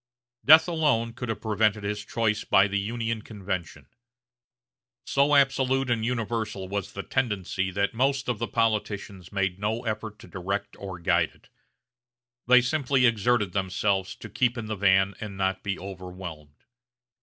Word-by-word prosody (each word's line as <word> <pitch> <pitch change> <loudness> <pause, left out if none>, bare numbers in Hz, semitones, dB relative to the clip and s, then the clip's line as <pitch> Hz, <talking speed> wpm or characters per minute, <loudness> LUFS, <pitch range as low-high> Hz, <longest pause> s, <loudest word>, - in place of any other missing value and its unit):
Death 155 +4 +8
alone 145 -9 +1
could 125 0 -6
have 115 - -3
prevented 105 -1 +1
his 105 0 -3
choice 110 -1 0
by 95 +1 +4
the 100 0 -1
Union 115 +2 -2
convention. 95 -5 -5 1.2
So 140 +1 +3
absolute 135 -2 +2
and 115 -2 0
universal 115 -4 -2
was 100 -1 -4
the 100 - -5
tendency 100 -7 -1
that 100 +3 -1
most 135 +3 +1
of 120 -4 -1
the 115 - -2
politicians 105 -4 -2
made 100 -2 -1
no 110 +4 -2
effort 110 -1 -4
to - - -14
direct 100 +2 -4
or 95 -2 -6
guide 85 -1 +1
it; - - -25 1.0
they 125 0 +7
simply 130 0 +1
exerted 115 -4 +2
themselves 95 0 0
to - - -10
keep 120 -1 0
in 115 - -4
the 110 0 -3
van 95 0 +3
and 105 -3 -7
not 95 0 0
be 100 -2 -2
overwhelmed. 90 -6 -9
105 Hz, 155 wpm, -26 LUFS, 95-120 Hz, 1.2 s, Death